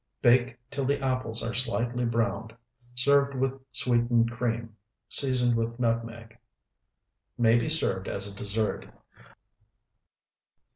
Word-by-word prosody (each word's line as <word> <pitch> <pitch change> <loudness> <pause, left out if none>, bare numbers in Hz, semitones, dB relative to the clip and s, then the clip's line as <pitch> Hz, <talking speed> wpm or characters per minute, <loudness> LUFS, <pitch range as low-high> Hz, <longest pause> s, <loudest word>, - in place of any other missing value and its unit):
Bake 125 0 +3
till 140 -1 -2
the 140 +2 0
apples 130 -4 -2
are 115 +1 -3
slightly 120 0 -1
browned. 115 -1 -2 0.4
Serve 140 +2 +2
with 135 +1 -2
sweetened 120 -2 +1
cream, 115 -2 -3 0.3
seasoned 125 -3 +3
with 115 +1 -3
nutmeg. 115 -1 -3 1.0
May 115 -1 +4
be 120 +4 0
served 100 -12 +3
as 100 0 -1
a 100 -1 -5
dessert. 105 +2 -2
120 Hz, 110 wpm, -27 LUFS, 115-130 Hz, 1.0 s, May